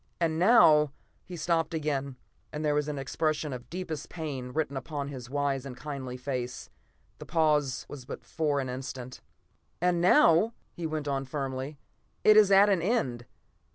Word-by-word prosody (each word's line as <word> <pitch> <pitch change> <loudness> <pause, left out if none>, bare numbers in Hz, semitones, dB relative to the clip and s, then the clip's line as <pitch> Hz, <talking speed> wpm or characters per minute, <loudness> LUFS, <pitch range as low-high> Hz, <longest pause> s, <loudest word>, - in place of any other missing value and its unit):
And 160 -2 0
now 155 - +6
" - - -40
He 180 - -7
stopped 165 0 0
again, 140 -3 -2 0.4
and 150 +1 -4
there 150 - +2
was 150 0 0
an 150 -1 -3
expression 150 +2 -1
of 125 -1 -8
deepest 170 -5 -5
pain 145 -6 -5
written 150 -1 -2
upon 140 +1 -4
his 125 -3 -8
wise 140 -1 -1
and 130 -2 -8
kindly 130 -2 -6
face. 125 -1 -5 0.5
The - - -9
pause 150 -6 +1
was 135 -4 -9 0.2
for 155 -3 -1
but - - +1
an 130 - -5
instant. 130 -1 -7 0.6
"And 175 -1 +1
now," 175 +4 +5 0.2
he 170 -2 -4
went 155 -2 -4
on 135 -1 -1
firmly, 135 +1 -4 0.5
"it 215 - +7
is 210 -2 +7
at 200 +1 +7
an 195 -4 +2
end. 135 - -1
150 Hz, 170 wpm, -29 LUFS, 135-165 Hz, 0.6 s, it